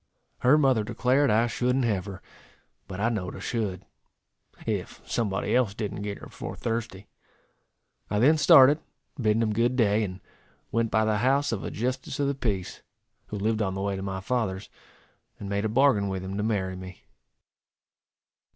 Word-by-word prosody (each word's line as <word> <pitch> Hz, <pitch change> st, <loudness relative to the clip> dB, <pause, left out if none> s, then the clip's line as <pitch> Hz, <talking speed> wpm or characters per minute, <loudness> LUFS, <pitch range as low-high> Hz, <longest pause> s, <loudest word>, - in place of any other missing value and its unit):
Her 130 Hz, +4 st, +5 dB
mother 130 Hz, -7 st, +3 dB
declared 130 Hz, +6 st, +2 dB
I 110 Hz, +2 st, +4 dB
shouldn't 125 Hz, +2 st, 0 dB
have 100 Hz, -5 st, 0 dB
her; 95 Hz, -2 st, -9 dB, 0.6 s
but 95 Hz, 0 st, -7 dB
I 115 Hz, +3 st, +2 dB
know'd 100 Hz, -6 st, -3 dB
I -, -, -8 dB
should, 100 Hz, -6 st, -3 dB, 0.8 s
if -, -, -3 dB
somebody 105 Hz, -3 st, -1 dB
else 120 Hz, -6 st, +2 dB
didn't 105 Hz, -2 st, -4 dB
get 105 Hz, 0 st, -4 dB
her -, -, -11 dB
before -, -, -7 dB
Thursday. 115 Hz, -4 st, -4 dB, 1.0 s
I 105 Hz, -, 0 dB
then 150 Hz, +8 st, +4 dB
started, 145 Hz, +1 st, +7 dB, 0.4 s
bidding 110 Hz, -1 st, +2 dB
them 110 Hz, -2 st, +1 dB
good 120 Hz, +3 st, +1 dB
day, 110 Hz, -3 st, +3 dB
and 95 Hz, -2 st, -5 dB, 0.5 s
went 115 Hz, 0 st, +1 dB
by 110 Hz, 0 st, +2 dB
the 110 Hz, -1 st, +1 dB
house 135 Hz, +4 st, +2 dB
of 110 Hz, -4 st, -3 dB
a -, -, -3 dB
justice 130 Hz, +4 st, -3 dB
of 145 Hz, -, +2 dB
the 140 Hz, -, +1 dB
peace, 105 Hz, -8 st, -3 dB, 0.5 s
who 105 Hz, -, -5 dB
lived 110 Hz, +2 st, 0 dB
on 95 Hz, -2 st, -1 dB
the 95 Hz, -, -3 dB
way 100 Hz, 0 st, -1 dB
to 95 Hz, -, -5 dB
my 95 Hz, -1 st, -4 dB
father's, 105 Hz, -4 st, -2 dB, 0.7 s
and 100 Hz, -, -6 dB
made 100 Hz, +1 st, -1 dB
a -, -, 0 dB
bargain 120 Hz, -4 st, +3 dB
with 95 Hz, -1 st, -3 dB
him 95 Hz, +1 st, -5 dB
to 105 Hz, -, -1 dB
marry 100 Hz, -4 st, -1 dB
me. 95 Hz, 0 st, -10 dB
110 Hz, 180 wpm, -27 LUFS, 100-125 Hz, 1.0 s, started